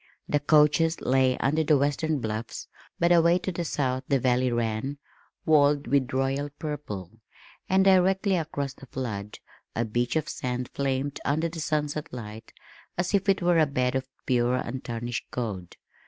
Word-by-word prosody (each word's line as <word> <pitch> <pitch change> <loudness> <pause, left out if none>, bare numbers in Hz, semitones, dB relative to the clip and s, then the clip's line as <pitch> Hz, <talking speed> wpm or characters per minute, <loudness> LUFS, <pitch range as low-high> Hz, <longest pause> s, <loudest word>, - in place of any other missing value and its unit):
The 145 - +2
coaches 155 +2 +4
lay 130 -1 +2
under 155 +4 +1
the 150 -1 +4
western 145 +3 0
bluffs, 110 0 -4 0.3
but 170 +1 +2
away 170 0 +5
to 185 +1 -3
the 175 0 -3
south 130 -4 -1
the 140 - +3
valley 125 0 +2
ran, 120 +4 -1 0.5
walled 145 -2 +4
with 130 +1 +1
royal 135 +2 0
purple, 135 - -5 0.6
and 190 +1 +4
directly 190 +1 +4
across 145 -5 -3
the 135 - -14
flood, 105 -6 -5 0.4
a 115 - 0
beach 120 +4 -1
of 155 -1 0
sand 125 0 -3
flamed 135 0 -1
under 160 +4 0
the 165 0 -7
sunset 150 -1 -2
light 110 -2 -8 0.5
as 175 +3 -1
if 200 0 +2
it 195 -2 +2
were 175 -1 +4
a 155 - +4
bed 125 -2 0
of 130 0 -2 0.2
pure 125 0 +2
untarnished 120 -1 -4
gold. 100 -8 -5
140 Hz, 160 wpm, -27 LUFS, 125-160 Hz, 0.6 s, away